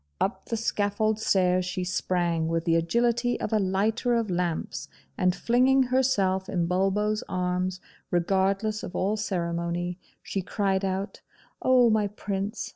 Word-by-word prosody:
Up 195 - -1
the 230 - -2
scaffold 215 0 0
stairs 185 -3 +2
she 180 0 -3
sprang, 175 -3 0
with 165 0 -1
the 165 -1 +3
agility 235 +8 +1
of 215 - -3
a 215 - +4
lighter 210 +5 +1
of 225 -4 0
lamps; 175 -2 -2 0.3
and 180 -2 +2
flinging 260 +3 +3
herself 210 -8 +1
in 175 -2 0
Bulbo's 195 +4 +1
arms, 180 0 -1 0.3
regardless 195 +4 +1
of - - -7
all 200 +3 +1
ceremony, 175 -3 -2 0.2
she 195 - -3
cried 195 +1 -1
out, 195 +1 -3 0.4
'Oh, 250 -3 +5
my 215 -1 +2
Prince! 200 +1 -4
195 Hz, 140 wpm, -27 LUFS, 180-215 Hz, 0.4 s, Oh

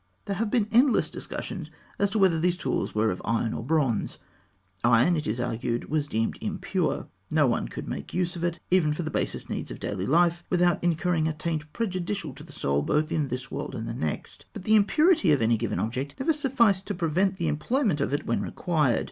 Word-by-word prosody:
There 200 -2 -2
have 225 0 0
been 220 -2 +2
endless 250 +3 +4
discussions 180 -8 -6 0.3
as 200 - +3
to 200 - -2
whether 185 -5 +4
these 175 +2 +1
tools 130 -9 -2
were 110 +1 +2
of 90 - -5
iron 115 0 0
or - - -3
of 115 - -7
bronze. 140 -8 +1 0.7
Iron, 120 +9 +5
it 155 -3 -2
is 110 +3 -1
argued, 120 +1 -2
was 150 -2 +1
deemed 115 -4 -1
impure. - - -1 0.2
No - - +3
one - - 0
could - - -7
make 70 - -5
use 180 0 -1
of 170 - -5
it, 175 -1 -1
even 165 -5 +4
for 175 - -3
the 155 - -4
basest - - -2
needs - - -4
of - - -7
daily 95 - -3
life, 170 +2 +3
without 175 -1 +2
incurring 170 -1 +1
a 160 - -1
taint 155 -1 -3
prejudicial 185 - -3
to 145 - -10
the 160 - -14
soul 70 - 0
both 155 - 0
in 155 -3 0
this 130 +1 -5
world 140 - -4
and 115 -2 -4
the - - -3
next. 80 -10 -4
But - - -7
the 215 - +2
impurity 215 - +4
of 140 - +2
any 115 +1 +4
given 115 +1 -2
object 130 +6 -3
never 320 +5 +2
sufficed 235 -9 +2
to 205 - -2
prevent 180 +3 +1
the 170 - -1
employment 165 - +1
of 140 - 0
it 145 - -1
when 115 - 0
required. 150 -9 +1
160 Hz, 220 wpm, -27 LUFS, 130-185 Hz, 0.7 s, Iron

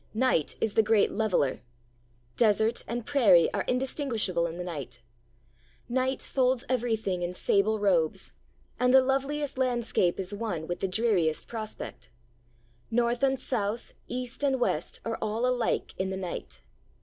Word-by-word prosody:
Night 240 - +2
is 220 - 0
the - - +5
great 220 -1 +3
leveller. 200 -11 0 0.7
Desert 220 0 +3
and 235 0 -4
prairie 215 - +5
are - - 0
indistinguishable 250 - 0
in 165 +1 -7
the 180 - -4
night. 140 -8 -6 0.9
Night 260 +2 0
folds 255 -2 +1
everything 225 -7 -1
in 175 +1 -3
sable 205 +4 +2
robes, 180 -6 +1 0.5
and 250 0 +3
the - - +10
loveliest 275 +1 -1
landscape 240 -8 +1
is 190 +1 -3
one 205 -7 -3
with 175 +1 -4
the 195 - 0
dreariest 185 -6 +1
prospect. 215 - -7 0.8
North 235 +1 +1
and 270 -1 +2
South, 230 -3 -2
East 250 +1 -5
and 270 -2 +2
West, 170 -9 -1
are 225 0 -3
all 220 +3 -1
alike 250 -2 0
in 190 0 0
the 190 - -3
night. 185 -2 -6
220 Hz, 145 wpm, -28 LUFS, 185-250 Hz, 0.9 s, the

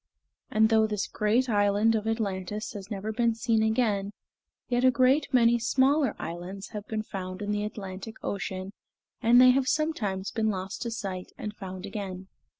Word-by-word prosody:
And 220 0 +4
though 220 -1 +4
this 210 -2 -2
great 225 +5 +1
island 205 0 +3
of 220 -1 -1
Atlantis 210 -2 -2
has 200 -2 -8
never 210 0 -3
been 230 0 +1
seen 225 -1 +1
again, 220 -3 +1 0.5
yet 245 0 +1
a 260 - +7
great 260 +3 +3
many 235 -2 +4
smaller 265 +5 +2
islands 175 +4 -6
have 210 -1 -7
been 215 -1 -2
found 185 -3 -6
in 205 0 -3
the 210 0 -1
Atlantic 205 0 -6
Ocean, 190 -1 -4 0.5
and 240 +1 +6
they 255 0 +8
have 260 0 +1
sometimes 240 -12 -1
been 220 -1 0
lost 190 -1 -4
to 235 - -2
sight 190 -5 -5
and 210 - -5
found 190 -1 -7
again. 195 -2 -6
215 Hz, 170 wpm, -28 LUFS, 195-235 Hz, 0.5 s, they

